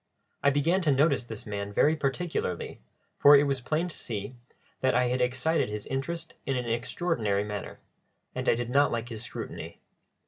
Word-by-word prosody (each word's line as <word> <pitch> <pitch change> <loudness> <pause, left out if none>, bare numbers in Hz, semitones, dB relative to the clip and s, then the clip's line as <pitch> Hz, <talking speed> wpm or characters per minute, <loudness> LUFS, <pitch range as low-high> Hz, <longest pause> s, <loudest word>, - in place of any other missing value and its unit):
I 140 - +5
began 155 +7 +2
to 155 -5 +3
notice 140 -2 +3
this 110 -3 -7
man 100 -1 -4
very 150 +9 +3
particularly, 140 - -2 0.4
for 145 +1 +9
it 140 - +6
was 140 -2 0
plain 155 +7 0
to 175 - -4
see 110 +2 -4 0.4
that 130 0 +2
I 125 -1 +3
had 125 +1 0
excited 125 +4 +1
his 105 -1 -5
interest 165 +5 -4
in 135 -2 -1
an 125 - -2
extraordinary 115 - 0
manner, 105 -2 -6 0.5
and - - -1
I - - +5
did 120 +1 -3
not 140 +2 +4
like 120 +1 -3
his 110 -2 -6
scrutiny. 120 - -7
130 Hz, 180 wpm, -28 LUFS, 115-145 Hz, 0.5 s, for